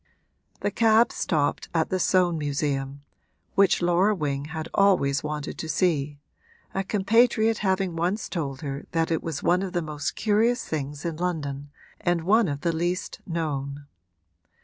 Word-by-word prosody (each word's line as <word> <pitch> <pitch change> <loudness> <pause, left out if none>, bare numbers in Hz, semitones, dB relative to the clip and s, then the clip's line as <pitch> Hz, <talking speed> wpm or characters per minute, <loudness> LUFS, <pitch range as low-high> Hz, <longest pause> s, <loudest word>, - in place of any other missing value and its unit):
The - - 0
cab 225 0 +4
stopped 150 -5 -1
at 160 -1 +2
the 185 - +1
Soane 180 -2 +2
Museum, 140 -1 -2 0.5
which 195 -2 +3
Laura 180 +5 +3
Wing 145 -4 -2
had 160 0 -5
always 180 -9 +3
wanted 150 -1 -4
to 160 - -5
see, 150 -4 +1 0.6
a 195 - -1
compatriot 220 +3 +3
having 190 -3 0
once 180 +6 -1
told 140 -7 -4
her 140 -1 -5
that 165 0 +1
it 160 - +1
was 160 -3 -4
one 180 +1 +3
of 195 -2 -4
the 175 - 0
most 150 -1 -4
curious 230 +3 +2
things 145 -1 -4
in 165 -2 -2
London 145 -5 -3 0.3
and 175 -1 0
one 215 +4 +4
of 145 -2 -3
the 170 -1 0
least 175 +3 -2
known. 145 -4 -3
165 Hz, 155 wpm, -25 LUFS, 145-190 Hz, 0.6 s, cab